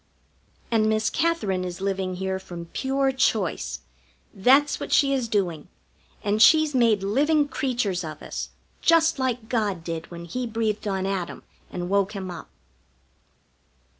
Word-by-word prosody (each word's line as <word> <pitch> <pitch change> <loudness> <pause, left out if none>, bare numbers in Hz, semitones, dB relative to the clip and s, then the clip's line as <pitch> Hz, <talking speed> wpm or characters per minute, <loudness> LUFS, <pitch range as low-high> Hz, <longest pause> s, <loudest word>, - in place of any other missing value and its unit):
And 215 -1 +3
Miss 220 0 +1
Katherine 215 - 0
is 180 0 -5
living 190 -1 -2
here 190 +1 -2
from 175 -2 -8
pure 270 0 +1
choice. 220 -8 0 0.5
That's 270 +8 +4
what - - -6
she 275 -1 +4
is 255 -3 0
doing, 180 -8 -1 0.6
and 210 0 +1
she's 310 +4 +6
made 230 -6 +3
living 290 +8 +2
creatures 245 -9 -1
of 155 -1 -7
us, - - -5 0.3
just 330 -2 +4
like 250 -3 -1
God 205 -8 -1
did 165 0 -5
when 170 -1 -8
He 250 +8 -3
breathed 220 -2 -2
on 190 -1 -1
Adam 190 -3 -3 0.3
and 175 -1 -4
woke 200 +1 +1
him 190 -3 -5
up. 175 - -9
210 Hz, 145 wpm, -25 LUFS, 185-260 Hz, 0.6 s, she's